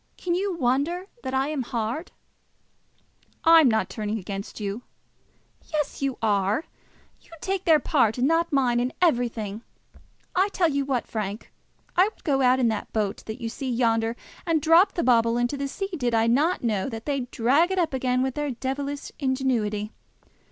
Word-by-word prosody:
Can 350 - -2
you 375 0 -1
wonder 290 +7 0 0.2
that 260 - -3
I 270 +2 +1
am 300 -3 -2
hard?" 235 +6 -3 1.3
"I 330 0 +8
am 280 - +5
not 220 -1 +1
turning 215 0 -3
against 195 +1 -6
you." 205 +2 -4 0.9
"Yes; 300 -3 -2
you 275 -2 -1
are. 205 +4 +1 0.6
You - - -24
take 385 +2 -2
their 320 -3 +6
part, 250 -6 +2
and 250 +2 +2
not 330 +2 +2
mine, 250 -4 +2
in 250 +2 -1
everything. 235 - 0 0.7
I 380 +3 +3
tell 355 -4 +2
you 280 -1 0
what, 260 -3 -1
Frank; 210 -1 -5 0.4
I 365 - +6
would 430 - -8
go 275 -4 +1
out 255 0 +4
in 245 - +3
that 220 -2 -4
boat 210 -3 -1
that 220 +2 -6
you 230 - -4
see 260 +3 -5
yonder, 230 -1 +1 0.3
and 330 -2 +1
drop 330 +5 +5
the 345 - 0
bauble 230 -1 +3
into 240 +3 0
the 280 0 -3
sea, 390 +8 -4
did 245 -6 0
I 225 0 +3
not 290 +10 +2
know 215 -2 0
that 225 -2 -7
they'd 275 -4 -2
drag 275 +11 +3
it 380 - -2
up 340 -5 +1
again 255 -1 +1
with 265 -1 -1
their 295 +1 -2
devilish 275 +3 -4
ingenuity. 245 -6 -1
260 Hz, 180 wpm, -25 LUFS, 230-305 Hz, 1.3 s, I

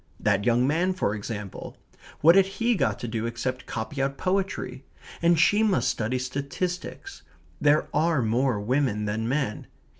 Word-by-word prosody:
That 100 -1 +1
young 120 +1 +3
man 175 +6 +1
for 105 - 0
example. 105 -2 -6 0.4
What 165 +3 +8
had 195 0 +5
he 230 +5 0
got 135 - 0
to 120 - -3
do 115 0 -2
except 125 +2 -4
copy 120 +5 -4
out 135 0 -1
poetry? 185 -9 -2 0.4
And 170 -1 +4
she 205 +5 +4
must 210 -4 +2
study 115 +3 -1
statistics. 140 - -4 0.4
There 150 +1 +3
are 155 -3 +2
more 120 +1 +1
women 110 -1 0
than 110 +2 -2
men. 130 -6 -2
135 Hz, 155 wpm, -26 LUFS, 115-170 Hz, 0.4 s, What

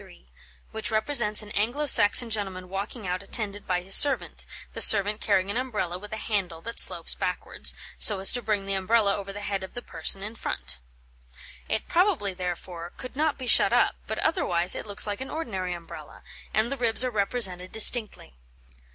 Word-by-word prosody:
603, - - -19 0.4
which 220 -1 -5
represents 220 -1 +2
an 205 - -13
Anglo 240 +10 -2
Saxon 235 -2 +6
gentleman 190 -4 -4
walking 200 +3 -7
out 180 +1 -4
attended 205 0 -6
by 180 -1 -2
his 195 +1 -1
servant, 280 +4 +4 0.3
the - - -6
servant 210 +1 +7
carrying 195 -1 -1
an 215 - -4
Umbrella 215 -9 -5
with 210 +1 -12
a 220 - -6
handle 195 -7 -4
that 230 +6 -5
slopes - - +2
backwards, - - -2 0.2
so 210 - +6
as 195 - +3
to 245 - -2
bring 210 -4 -3
the 195 - -4
Umbrella 200 +1 0
over 200 -1 -8
the 205 +1 -10
head 200 -2 -5
of 190 - -12
the 245 - -6
person 170 +4 +1
in 210 +2 -6
front. 60 - -6 0.9
It - - -3
probably, 335 - -1
therefore, 175 -1 -8
could 255 - -10
not 305 +1 -1
be 260 - -8
shut - - +4
up, - - +1
but - - -5
otherwise 175 - 0
it - - -7
looks 205 0 -3
like 205 +3 -6
an 265 - -7
ordinary 190 - -6
Umbrella, 170 -1 -13 0.3
and 220 +4 -1
the 275 - -4
ribs 235 -1 0
are 255 - -3
represented 200 -4 0
distinctly. 220 - +2
205 Hz, 190 wpm, -24 LUFS, 185-230 Hz, 0.9 s, servant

